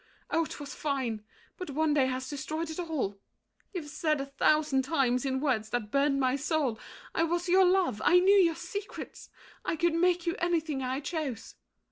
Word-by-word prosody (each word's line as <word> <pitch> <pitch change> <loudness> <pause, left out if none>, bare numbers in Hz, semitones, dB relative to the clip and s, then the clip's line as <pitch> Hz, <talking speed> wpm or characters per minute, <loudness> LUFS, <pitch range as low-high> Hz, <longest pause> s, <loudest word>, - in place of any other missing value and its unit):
Oh, 330 - +2
'twas 290 -1 -7
fine! 260 -7 -2 0.3
But 365 -5 -6
one 305 +2 +1
day 275 -3 +3
has 260 0 -3
destroyed 310 +4 -4
it 315 - -6
all. 295 - -2 0.5
You've 345 -6 -5
said 305 0 0
A 275 - -2
thousand 280 0 +2
times, 265 -3 +1
in 265 0 0
words 250 -7 0
that 215 -3 -3
burned 275 +1 +2
my 260 -1 +2
soul, 280 -5 0 0.3
I - - +1
was 345 +2 0
your 375 +2 +5
love, 360 - +2
I 360 - +6
knew 390 +3 +5
your 340 -4 +4
secrets, 380 +5 -7 0.3
I - - -1
Could 340 +1 +1
make 350 +1 +2
you 340 +1 0
anything 325 -5 0
I 260 +2 -2
chose. 290 -7 -4
300 Hz, 180 wpm, -29 LUFS, 265-335 Hz, 0.5 s, I